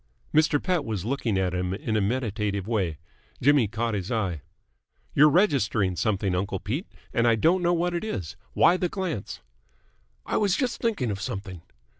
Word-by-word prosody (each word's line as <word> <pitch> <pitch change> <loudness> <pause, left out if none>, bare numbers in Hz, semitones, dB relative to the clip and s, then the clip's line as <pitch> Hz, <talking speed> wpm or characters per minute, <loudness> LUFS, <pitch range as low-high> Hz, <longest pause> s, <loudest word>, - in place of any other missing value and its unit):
Mr. 150 -1 +4
Pett 180 -3 0
was 105 -7 -3
looking 120 -5 -1
at 95 -1 0
him 90 +1 -1
in 110 +2 -3
a 105 - +2
meditative 105 -3 -1
way. 95 -9 -1 0.4
Jimmy 140 -3 +4
caught 115 +2 -2
his 100 0 -3
eye. 95 - -1 0.7
"You're 150 +2 +7
registering 125 - +2
something, 100 -1 0
uncle 95 +1 -1
Pete, 140 - -3 0.3
and 115 0 +2
I 115 - +5
don't 170 - +3
know 175 0 +2
what 175 +1 0
it 170 - -2
is. 95 - -4 0.2
Why 175 +2 +5
the 180 -1 -1
glance?" 175 - -4 0.8
"I - - 0
was 200 -3 +2
just 255 -3 -1
thinking 205 - 0
of 100 0 -4
something." 95 -6 -5
115 Hz, 175 wpm, -26 LUFS, 100-155 Hz, 0.8 s, You're